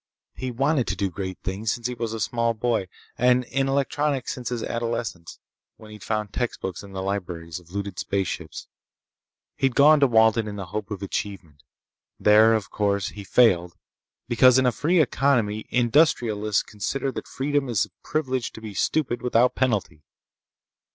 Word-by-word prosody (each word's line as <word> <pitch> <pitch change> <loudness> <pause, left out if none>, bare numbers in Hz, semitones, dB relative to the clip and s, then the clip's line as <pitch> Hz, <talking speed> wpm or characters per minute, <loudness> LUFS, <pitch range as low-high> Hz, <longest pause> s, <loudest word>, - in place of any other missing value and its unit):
He'd 125 -2 -6
wanted 140 -1 +2
to - - -1
do 100 -3 -1
great 95 +1 -5
things 100 +3 -2
since 120 - -5
he 125 - -1
was 115 -2 -4
a 115 - -4
small 115 +1 0
boy, 110 -4 0 0.3
and 125 +1 +4
in 135 +2 -1
electronics 140 0 0
since 125 -2 -5
his 120 -2 -3
adolescence, 115 -7 -4 0.4
when 110 -1 -13
he'd 105 -1 -11
found 105 -2 -2
textbooks 95 -7 -3
in 100 -1 -12
the 95 0 -4
libraries 90 -4 -4
of 85 -2 -20
looted 100 0 -5
spaceships. 95 -4 -3 0.9
He'd 135 -2 +1
gone 150 +2 +6
to 140 - +5
Walden 110 -1 +4
in 105 - -5
the 100 -2 -5
hope 105 -1 -3
of 100 -2 -5
achievement. 95 -7 -5 0.6
There, 110 +2 +6
of 110 -3 -3
course, 100 -2 0
he 105 - -9
failed 90 -6 +3 0.5
because 125 +1 +5
in 130 - +3
a 125 - +4
free 170 +9 +1
economy 120 -8 +1
industrialists 120 - +2
consider 135 +6 -3
that - - -7
freedom 140 0 -1
is 110 -7 +2
the - - -8
privilege 130 -5 -2
to - - -9
be 110 -2 -7
stupid 125 +2 0
without 125 0 +3
penalty. 105 - -1
115 Hz, 170 wpm, -24 LUFS, 100-125 Hz, 0.9 s, gone